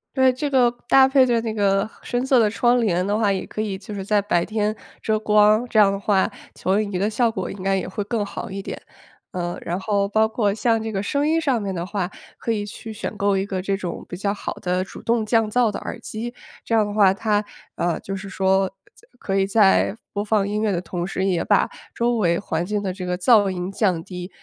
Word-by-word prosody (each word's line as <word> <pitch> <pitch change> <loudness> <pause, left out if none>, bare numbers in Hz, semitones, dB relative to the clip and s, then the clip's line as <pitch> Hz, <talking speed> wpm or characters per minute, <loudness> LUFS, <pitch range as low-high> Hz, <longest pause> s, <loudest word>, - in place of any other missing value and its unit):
对， 260 -1 +5
这 285 +3 -2
个 255 -3 +4 0.2
搭 265 -1 +7
配 265 -1 +5
着 240 -2 +2
那 225 -1 -3
个 200 0 +1
深 245 +1 -1
色 265 -1 +4
的 220 -3 +4
窗 240 +2 +2
帘 180 -4 +1
的 205 +1 +1
话 210 -3 +2
也 190 - -2
可 215 - -4
以 200 -3 -3
就 205 +2 -9
是 195 - -4
在 205 +1 +2
白 185 -4 +1
天 215 0 -1 0.3
遮 220 -1 +1
光， 215 +1 +4
这 220 - +3
样 205 - +7
的 200 - -2
话 200 -1 +2 0.2
投影仪 200 0 0
的 205 - +1
效 230 +1 +1
果 190 -4 -4
应 195 - -7
该 195 0 +2
也 185 - -3
会 205 +2 -3
更 210 0 -2
好 200 - -7
一 195 +1 -4
点。 - - -7 0.5
呃， 175 -1 -3
然 175 +2 -3
后 200 0 0
包 220 +1 +3
括 220 -2 0
像 225 +1 +1
这 225 - -3
个 195 -2 -2
声 280 +8 0
音 320 +2 +2
上 265 -8 +1
面 195 -1 -3
的 170 0 -3
话， 195 -2 -3 0.3
可 230 - -2
以 210 -2 -1
去 220 +2 -8
选 220 0 -5
购 200 -1 +1
一 190 - 0
个 190 -2 -3
这 195 +1 -1
种 180 -4 -5
比 180 - -6
较 200 +2 -1
好 - - -5
的 180 0 -1
主 - - -11
动 230 -1 +1
降 225 -1 +2
噪 235 -1 +2
的 - - -5
耳 - - -6
机， 235 +3 -5 0.3
这 230 - +1
样 215 -2 +4
的 205 - -5
话 200 -3 +5
它， 210 0 0 0.3
呃， 170 -2 0
就 195 - -6
是 195 0 -6
说 190 0 +2 0.3
就 - - -23
可 195 0 -1
以 195 0 +2
在 200 0 +4 0.2
播 205 0 -2
放 210 -2 +2
音 210 +1 -2
乐 215 - +1
的 175 - -1
同 175 0 -4
时 190 - -2
也 180 -3 +1
把 - - +3 0.3
周 235 0 +1
围 170 -5 +2
环 170 -4 -2
境 205 +1 -2
的 190 - -1
这 185 0 -6
个 180 0 -1
噪 205 +1 +5
音 180 +1 -4
降 185 -5 0
低， 180 0 -7
205 Hz, 270 characters per minute, -22 LUFS, 190-220 Hz, 0.5 s, 搭